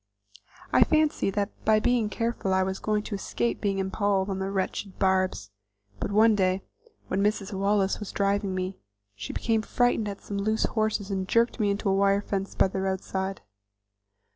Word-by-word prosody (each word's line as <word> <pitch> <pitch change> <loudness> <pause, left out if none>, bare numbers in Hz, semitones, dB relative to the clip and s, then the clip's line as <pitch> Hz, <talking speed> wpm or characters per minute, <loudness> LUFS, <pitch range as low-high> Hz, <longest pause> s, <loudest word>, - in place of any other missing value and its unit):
I - - +7
fancied 310 -10 +1
that 205 0 0
by 215 0 +4
being 235 -1 +1
careful 230 -4 -1
I 190 - +3
was 190 0 -3
going 210 -1 0
to 215 - -6
escape 120 -11 -2
being 200 -1 0
impaled 195 0 0
on 190 - -3
the 190 0 -2
wretched 195 0 -3
barbs; 185 - +1 0.5
but - - -3
one 220 +2 +5
day, 185 -1 +1 0.4
when 190 - 0
Mrs. 205 0 0
Wallace 195 0 +1
was 210 - -6
driving 200 -1 0
me, 185 +1 -3 0.3
she 100 0 -6
became 225 -2 0
frightened 235 -1 +1
at 200 -1 -6
some 200 -1 -4
loose 215 +2 +1
horses, 215 -2 -1
and 190 -1 -2
jerked 235 +3 +2
me 210 -2 +2
into 200 +1 -1
a 195 - +3
wire 200 +1 +3
fence 195 -1 -3
by - - +4
the 190 0 -3
roadside. 190 0 -2
200 Hz, 180 wpm, -27 LUFS, 190-215 Hz, 0.5 s, I